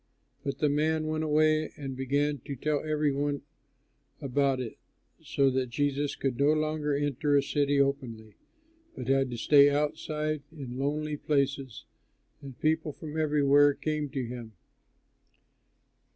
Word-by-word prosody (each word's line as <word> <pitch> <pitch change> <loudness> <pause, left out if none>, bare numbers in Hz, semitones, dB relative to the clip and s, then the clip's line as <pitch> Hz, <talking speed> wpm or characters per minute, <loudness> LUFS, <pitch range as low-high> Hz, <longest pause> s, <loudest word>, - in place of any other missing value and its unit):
But 140 - -3
the 150 - +2
man 155 +2 +1
went 155 0 -1
away 155 0 +2
and 135 -3 -5
began 140 +2 0
to 140 - -5
tell 150 +2 -1
every 150 -1 +1
one 145 +1 -2 0.8
about 135 0 +1
it, 120 -4 -6 0.4
so 135 -1 +1
that 130 -1 -1
Jesus 145 +3 -1
could 135 -2 -2
no 145 +2 +4
longer 155 -1 0
enter 145 0 +1
a 140 - +3
city 145 0 +1
openly, 125 -6 -1 0.6
but 125 - -6
had 135 0 +2
to 120 - -5
stay 140 +4 +6
outside 150 +1 -1
in 130 -5 -7
lonely 150 +2 -1
places; 140 -4 -1 0.6
and 135 -3 -10
people 155 -1 0
from 155 +1 -8
everywhere 145 -2 +4
came 150 -2 -2
to 135 -3 -3
him. 120 -2 -8
145 Hz, 140 wpm, -29 LUFS, 135-150 Hz, 0.8 s, stay